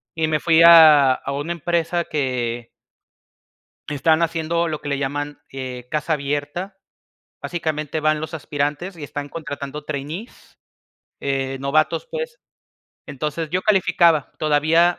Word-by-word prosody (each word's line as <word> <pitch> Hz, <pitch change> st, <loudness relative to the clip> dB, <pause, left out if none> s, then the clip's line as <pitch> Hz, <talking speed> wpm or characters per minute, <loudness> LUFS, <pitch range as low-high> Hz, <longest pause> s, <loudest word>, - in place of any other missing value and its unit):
y 160 Hz, -1 st, 0 dB
me 155 Hz, -2 st, 0 dB
fui 165 Hz, 0 st, +4 dB
a 155 Hz, -6 st, +8 dB
a 140 Hz, -, -6 dB
una 145 Hz, +5 st, -3 dB
empresa 170 Hz, +1 st, -1 dB
que 120 Hz, -5 st, -2 dB, 1.2 s
están 160 Hz, +3 st, +2 dB
haciendo 165 Hz, +1 st, 0 dB
lo 155 Hz, -1 st, -4 dB
que 145 Hz, -, -7 dB
le 140 Hz, -1 st, -1 dB
llaman, 145 Hz, +1 st, -3 dB
eh, 125 Hz, -2 st, -7 dB
casa 155 Hz, +1 st, -1 dB
abierta. 145 Hz, +7 st, -4 dB, 0.7 s
Básicamente, 155 Hz, -3 st, -3 dB
van 155 Hz, 0 st, +1 dB
los 155 Hz, +1 st, -6 dB
aspirantes 150 Hz, +4 st, -3 dB
y 150 Hz, -, -8 dB
están 145 Hz, 0 st, -6 dB
contratando 145 Hz, -2 st, -6 dB
trainees, 155 Hz, -, -7 dB, 0.6 s
eh, 135 Hz, -1 st, -2 dB
novatos, 155 Hz, -, +1 dB
pues. 485 Hz, 0 st, -5 dB, 0.7 s
Entonces, 150 Hz, +2 st, -4 dB
yo 185 Hz, +1 st, 0 dB
calificaba, 170 Hz, -6 st, +3 dB
todavía 160 Hz, +3 st, +3 dB
155 Hz, 130 wpm, -21 LUFS, 140-170 Hz, 1.2 s, a